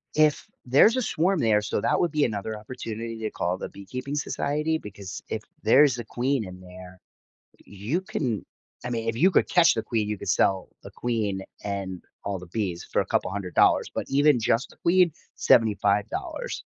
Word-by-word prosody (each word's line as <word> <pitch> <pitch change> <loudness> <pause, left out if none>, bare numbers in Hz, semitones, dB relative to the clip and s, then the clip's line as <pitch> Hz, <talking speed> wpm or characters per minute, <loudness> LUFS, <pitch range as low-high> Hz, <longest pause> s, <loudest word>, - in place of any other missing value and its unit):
If 155 -1 +3 0.2
there's 140 - +5
a 255 - +1
swarm 185 -3 +1
there, 110 -5 +3
so 105 - -2
that - - +1
would 175 - +1
be 150 -1 +1
another 110 -1 -2
opportunity 115 0 -6
to 110 -1 -2
call 90 -2 -2
the - - -5
beekeeping 125 +8 -6
society 150 +2 -1
because 100 -6 -8
if 110 - -3 0.2
there's 130 +1 +5
a 120 - -5
queen 125 +1 -1
in 90 0 -10
there, 90 0 -12 0.6
you 105 - -3
can 125 - -3 0.4
I - - -2
mean, 115 -2 -3
if 115 - -2
you 175 +11 +4
could - - +3
catch 175 -2 +5
the 110 - -1
queen, 110 -2 -1
you 105 - -2
could - - -8
sell 95 0 +2
the - - -10
queen 110 -5 -2 0.2
and 100 -3 -4 0.2
all 100 -1 -2
the 90 - -10
bees 90 -2 -3
for - - +2
a - - -3
couple - - 0
$100 95 -2 +2
but - - -3
even 145 -1 +4
just 115 +3 +1
the - - -17
queen, 180 0 +3 0.2
$75. 105 -2 +1
115 Hz, 185 wpm, -26 LUFS, 100-140 Hz, 0.6 s, there's